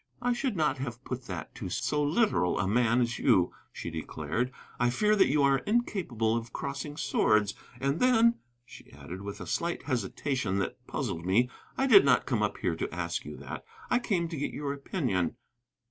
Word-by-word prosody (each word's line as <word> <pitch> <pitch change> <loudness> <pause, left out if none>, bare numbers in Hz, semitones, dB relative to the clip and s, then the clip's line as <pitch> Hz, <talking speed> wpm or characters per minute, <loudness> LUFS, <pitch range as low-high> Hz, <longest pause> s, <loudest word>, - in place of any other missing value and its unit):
"I 245 0 +1
should 240 -2 -1
not 145 -4 +1
have 125 -1 -5
put 125 -1 -5
that 90 -4 -6
to - - -6
so 150 0 0
literal 150 - +2
a 95 - 0
man 120 +3 +3
as 120 0 -1
you," 90 -2 +3 0.2
she 85 - -6
declared. 110 +9 -3 0.3
"I 120 0 +3
fear 210 - +3
that 200 - +5
you 145 +1 +3
are 135 -1 +4
incapable 165 - 0
of 115 0 -4
crossing 140 +2 -5
swords. 105 -8 +2 0.3
And 140 +4 0
then," 235 -2 +4 0.3
she - - -14
added, 90 +2 -8
with 100 0 -6
a - - -6
slight 170 +1 -2
hesitation 125 -3 -1
that 100 - -3
puzzled 80 - -3
me, 115 +8 +2 0.3
"I 270 - +2
did 385 +9 +8
not - - +4
come - - 0
up - - 0
here - - -1
to - - -3
ask - - -3
you - - -7
that, - - -7 0.3
I 250 - +4
came 185 -8 0
to 165 - -5
get 140 - -1
your 145 -1 -2
opinion." 135 - -1
135 Hz, 190 wpm, -29 LUFS, 110-170 Hz, 0.3 s, did